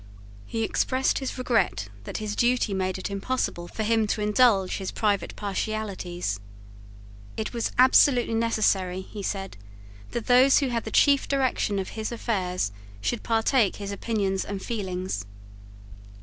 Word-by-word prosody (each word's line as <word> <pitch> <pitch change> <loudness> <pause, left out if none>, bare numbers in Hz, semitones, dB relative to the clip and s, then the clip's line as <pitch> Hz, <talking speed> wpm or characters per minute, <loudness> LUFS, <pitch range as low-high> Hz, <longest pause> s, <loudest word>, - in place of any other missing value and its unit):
He 225 - -2
expressed 260 +4 +1
his 265 -1 -4
regret 105 - 0 0.2
that - - -4
his 210 -1 -3
duty 240 -3 +2
made 185 -1 -1
it 190 - -5
impossible 200 -4 -2
for 220 - -4
him 220 0 +2
to 210 - -1
indulge 210 -3 +3
his 190 -2 -4
private 205 -2 -1
partialities. 195 - -3 1.0
It 220 - -3
was 235 -1 -1
absolutely 255 -1 +5
necessary, 205 -5 +1
he 205 +2 -8
said, 195 - -4 0.5
that 235 - -4
those 255 +2 +6
who 275 -3 +1
had 235 -2 -2
the - - -3
chief 280 +4 +4
direction 260 -6 0
of 190 - -3
his 220 0 -4
affairs 185 - -1 0.3
should 235 - -2
partake 225 -1 +2
his 200 -1 -5
opinions 200 -2 -1
and 200 -1 -5
feelings. 185 - -4
215 Hz, 145 wpm, -26 LUFS, 190-235 Hz, 1.0 s, those